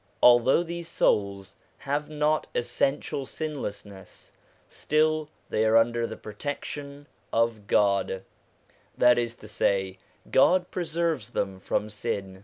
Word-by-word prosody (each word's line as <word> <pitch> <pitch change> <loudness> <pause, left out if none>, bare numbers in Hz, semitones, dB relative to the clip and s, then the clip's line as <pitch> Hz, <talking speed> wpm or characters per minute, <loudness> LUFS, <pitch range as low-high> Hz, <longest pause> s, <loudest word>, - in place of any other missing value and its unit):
Although 125 +6 +6
these 170 0 -6
souls 100 - 0 0.2
have 145 +2 -3
not 150 0 0
essential 135 +3 -1
sinlessness, 105 - -7 0.4
still 155 0 0 0.2
they 110 - +1
are 110 +1 +5
under 115 +1 +2
the - - -7
protection 140 +5 -6 0.3
of 115 -3 0
God: 100 -2 +2 0.7
that 125 0 +5
is 120 -1 -2
to 105 - -13
say, 95 -2 0 0.3
God 180 +6 +4
pre 180 - -2
serves 165 -8 -1
them 95 -1 -3
from 105 - -1
sin. 100 -3 -4
120 Hz, 120 wpm, -27 LUFS, 105-150 Hz, 0.7 s, Although